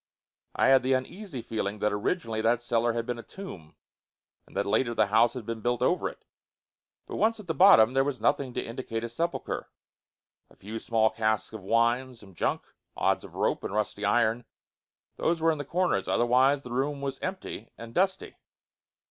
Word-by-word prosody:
I - - +3
had 135 -1 +6
the 130 +1 +1
uneasy 130 - -4
feeling 105 -2 -3
that 105 0 0
originally 110 - -1
that 115 +2 +2
cellar 120 0 +1
had 115 0 -2
been 120 -1 -3
a - - -5
tomb 100 - -10 0.7
and - - -10
that 100 - +1
later 120 +3 +1
the - - +4
house 115 +3 +4
had 125 -4 -6
been 115 0 -4
built 120 +2 0
over 180 +7 +1
it. - - -15 0.8
But, - - -6
once 225 0 +2
at 210 - -10
the 165 - -2
bottom, 160 - +7
there 135 0 +3
was 140 -2 -3
nothing 140 -3 +1
to - - -2
indicate 115 -1 -4
a 115 - -3
sepulcher. 170 +8 -3 0.8
A - - -20
few 110 +3 -7
small 110 -1 +2
casks 110 -1 -1
of 110 - -7
wine, 120 +5 +1
some 100 -4 -15
junk, - - -1 0.3
odds - - +1
of - - -12
rope - - 0
and 100 - -4
rusty 105 -1 -2
iron, 115 +2 +2 0.7
those 165 0 +1
were 165 0 +3
in 155 - -3
the 145 - -4
corners; 180 +5 0
otherwise, 130 +4 +3
the 125 - -9
room 140 +3 -1
was 135 -1 -4
empty, 185 - -5
and 115 0 -10
dusty. 190 +1 0
120 Hz, 190 wpm, -28 LUFS, 110-140 Hz, 0.8 s, bottom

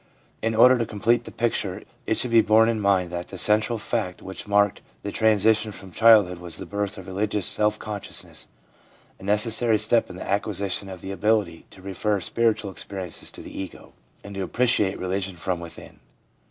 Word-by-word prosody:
In 115 0 0
order 125 +2 +6
to 115 - 0
complete 115 +3 +1
the - - -8
picture, 120 -1 -2 0.2
it 110 - +1
should 125 - -2
be 115 -1 +7
borne 110 +1 +4
in 110 -2 -1
mind 95 -3 +2
that 90 0 -5
the 95 - -9
central 110 +4 +3
fact 105 -4 -3
which 95 +2 -8
marked 100 -1 +2 0.2
the 100 - -4
tran 110 0 +3
sition 110 +1 +2
from 95 -2 -11
childhood 105 -4 +5
was 85 -1 -3
the 95 - -7
birth 100 +2 -3
of 95 - -9
religious 100 +1 -2
self 105 +3 +1
con 105 -2 -6
sciousness, - - -6 0.7
a - - -14
necessary 110 +3 +2
step 110 +2 +2
in 90 - -9
the 95 - -7
acquisition 100 -1 -2
of 95 -2 -9
the 95 - -6
ability 100 -4 0
to 95 - -16
refer 100 +1 -1
spiritual 110 0 0
experiences 95 -2 -6
to - - -10
the - - -11
ego, 95 -1 -8 0.3
and 100 - -9
to 100 - -4
appreciate 105 -1 +1
religion 95 0 -3
from 90 +1 -3
within. 85 -1 -11
100 Hz, 195 wpm, -24 LUFS, 95-110 Hz, 0.7 s, be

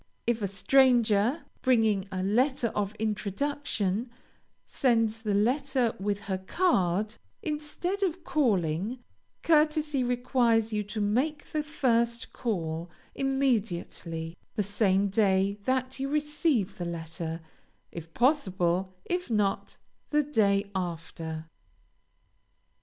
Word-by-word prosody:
If 235 -1 0
a 200 - 0
stranger, 240 - +3 0.2
bringing 220 -6 +3
a 185 -1 -2
letter 245 +4 +2
of 205 0 -2
introduction, 220 0 -1 0.6
sends 225 -3 +1
the 210 -2 0
letter 255 +2 +1
with 205 +1 -1
her 190 -2 -3
card, 200 - +1 0.3
instead 310 +6 -3
of 365 -3 -1
calling, 215 - 0 0.4
courtesy 300 -3 +3
requires 240 -2 +2
you 210 - +1
to 210 +1 -4
make 265 +9 0
the 305 - 0
first 235 -5 0
call, 170 -7 -3 0.2
immediately; 205 -11 -1 0.2
the 210 - +1
same 200 -1 +2
day 200 0 +2
that 260 0 0
you 270 +1 -2
receive 295 - 0
the 175 - -2
letter, 165 -1 -5 0.5
if 165 -1 -8
possible, 190 - +1
if 360 -3 -2
not, 210 -3 0 0.3
the 300 0 +3
day 200 -7 +1
after. 165 -3 -4
220 Hz, 110 wpm, -28 LUFS, 195-270 Hz, 0.6 s, stranger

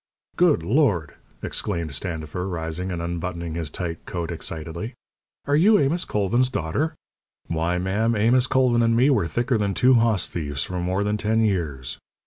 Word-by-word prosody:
"Good 170 - +3
Lord!" 100 - +2 0.3
exclaimed 85 -7 -2
Standifer, 80 +3 -4
rising 85 +2 -4
and 85 -1 -3
unbuttoning 85 -1 -4
his 80 -2 -3
tight 85 +1 -5
coat, 85 -1 -3
excitedly. 85 +6 -6 0.5
"Are 145 - +2
you 205 +8 +6
Amos 160 +5 +1
Colvin's 115 +5 +1
daughter? 130 - -1 0.5
Why, 85 +2 0
ma'am, 105 +6 0
Amos 120 +5 +3
Colvin 125 -3 +3
and 115 0 +3
me 130 +4 +5
were 105 -11 +2
thicker 120 +4 0
than 100 -2 0
two 130 +1 +5
hoss 115 -5 +3
thieves 75 -5 -3
for 90 -1 -4
more 90 +3 0
than 105 +1 0
ten 110 +1 +1
years! 80 - -1
95 Hz, 160 wpm, -24 LUFS, 85-120 Hz, 0.5 s, you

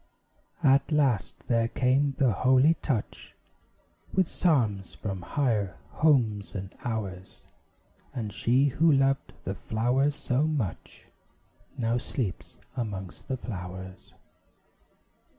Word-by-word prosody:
At 135 +3 +4
last 140 -8 +2
there 115 -1 +2
came 135 +3 +2
the 130 -3 +4
holy 130 - +4
touch, 120 -8 -3 0.8
With 185 -2 +2
psalms 115 - +1
from 95 -3 -4
higher 105 - 0
homes 120 -11 +2
and 95 0 -5
hours; 100 -6 -5 0.7
And 110 -4 -4
she 130 +4 +3
who 160 +5 +3
loved 135 -1 +2
the - - -2
flowers 125 +6 +1
so 125 -1 0
much 140 - -4 0.7
Now 115 0 +1
sleeps 90 -9 -4 0.2
amongst 100 -7 -5
the 130 - -2
flowers. 95 -4 -8
120 Hz, 105 wpm, -28 LUFS, 100-135 Hz, 0.8 s, At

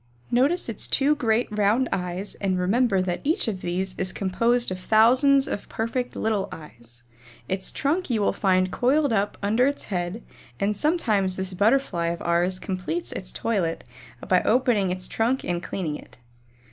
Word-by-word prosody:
Notice 280 +9 +2
its 225 -4 -3
two 285 +2 +3
great 235 -4 +1
round 215 +5 +2
eyes 180 +2 -3
and 190 -2 0
remember 195 +1 +2
that 180 -1 -3
each 310 -2 +1
of 195 -4 -3
these 185 +2 -2
is 185 -1 -1
composed 230 +5 +1
of 185 - -4
thousands 255 +8 +4
of 205 - -5
perfect 235 +3 -3
little 215 -3 -1
eyes. 120 -5 -10 0.4
Its 190 0 -1
trunk 320 +5 -1
you 230 -3 +1
will 205 - +1
find 185 -1 +1
coiled 275 +3 +2
up 205 -1 0
under 225 +6 +3
its 285 - -2
head 175 +5 -3 0.4
and 205 +1 0
sometimes 210 - +1
this 190 0 -3
Butterfly 205 -4 +1
of 170 0 -3
ours 175 +2 +1
completes 190 - -4
its - - -4
toilet 185 -8 -1 0.4
by - - +4
opening 240 -7 +2
its 185 0 -1
trunk 240 +4 0
and 175 -1 -2
cleaning 165 -6 -4
it. - - -16
205 Hz, 165 wpm, -24 LUFS, 185-245 Hz, 0.4 s, thousands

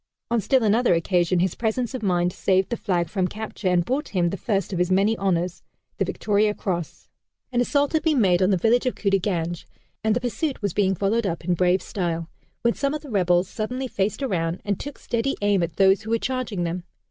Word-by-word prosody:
On 235 -2 +2
still 260 +4 +2
another 220 -1 +3
occasion, 175 +1 +1
his 185 -1 +1
presence 235 +2 -1
of 255 - -4
mind 180 -3 +1
saved 190 0 +1
the - - +1
flag 175 -6 -1
from 185 +1 0
capture 215 -1 -5
and 180 -2 +2
brought 275 +6 -1
him 175 -1 +2
the - - -2
first 200 -1 -1
of 180 - -2
his 180 0 +2
many 195 +4 +3
honors, 180 -2 -1 0.4
the - - +2
Victoria 210 0 +1
Cross. 175 -5 -4 0.4
An 245 -1 +2
assault 285 +4 +1
had 315 - +2
been 310 -4 +2
made 185 -4 +3
on 185 - +4
the 195 - +3
village 240 +7 +2
of 255 - 0
Khudaganj, 180 -4 -1 0.4
and 220 0 +2
the - - +1
pursuit 260 +4 -2
was 200 -5 -2
being 195 -2 +2
followed 205 +4 +1
up 165 -2 -4
in 180 - +2
brave 180 +2 +2
style, 170 -4 -3 0.4
when 235 0 +3
some 280 +1 -1
of 305 - -6
the 285 - -9
rebels 180 -3 +2
suddenly 250 +6 -3
faced 210 +3 -1
around 170 -7 -1
and 200 -2 -1
took 285 0 -7
steady 235 +3 -1
aim 205 -2 +3
at 170 -2 -2
those 195 +1 +4
who 220 - -8
were 230 - +3
charging 235 -7 -2
them. 175 +1 -2
200 Hz, 220 wpm, -24 LUFS, 180-235 Hz, 0.4 s, on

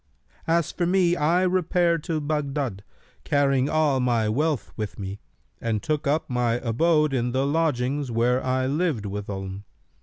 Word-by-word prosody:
As 165 -1 +2
for 175 - -1
me, 180 -1 +3
I 170 +4 +2
repaired 175 -2 +1
to 165 -3 -1
Baghdad, 140 -8 -2 0.4
carrying 140 -1 +2
all 155 -4 +2
my 120 -3 +1
wealth 150 +4 -1
with 105 -3 -5
me, 100 0 -6 0.4
and 110 -2 -1
took 150 -2 -1
up 150 +3 +1
my 125 -2 0
abode 150 +6 +2
in 120 -1 0
the 135 +1 +1
lodgings 145 -3 0
where 120 +2 +1
I 130 0 0
lived 145 - 0
whilome. 100 -1 -5
140 Hz, 150 wpm, -25 LUFS, 120-160 Hz, 0.4 s, me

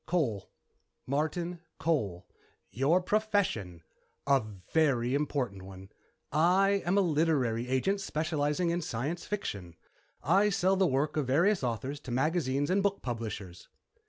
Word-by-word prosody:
"Cole. 125 - -1 0.6
Martin 165 +5 -2 0.2
Cole." 100 - -1 0.4
"Your 145 +9 +2
profession?" 185 - 0 0.4
"A 140 -1 +4 0.3
very 135 -6 +2
important 135 -8 -1
one. 95 0 -11 0.4
I 195 +5 +3
am 190 +3 +2
a - - +5
literary 145 - +1
agent 160 +11 0
specializing 155 0 0
in 175 +1 -1
science 150 +6 -4
fiction. 100 - -4 0.5
I 195 +8 +4
sell 195 -1 +2
the 190 -1 +3
work 145 +3 0
of 145 -4 0
various 175 +7 +3
authors 130 +4 -3
to 135 - -11
magazine 140 +1 +1
and 195 +2 +3
book 200 0 -1
publishers." 110 -7 -6
150 Hz, 130 wpm, -30 LUFS, 120-180 Hz, 0.6 s, a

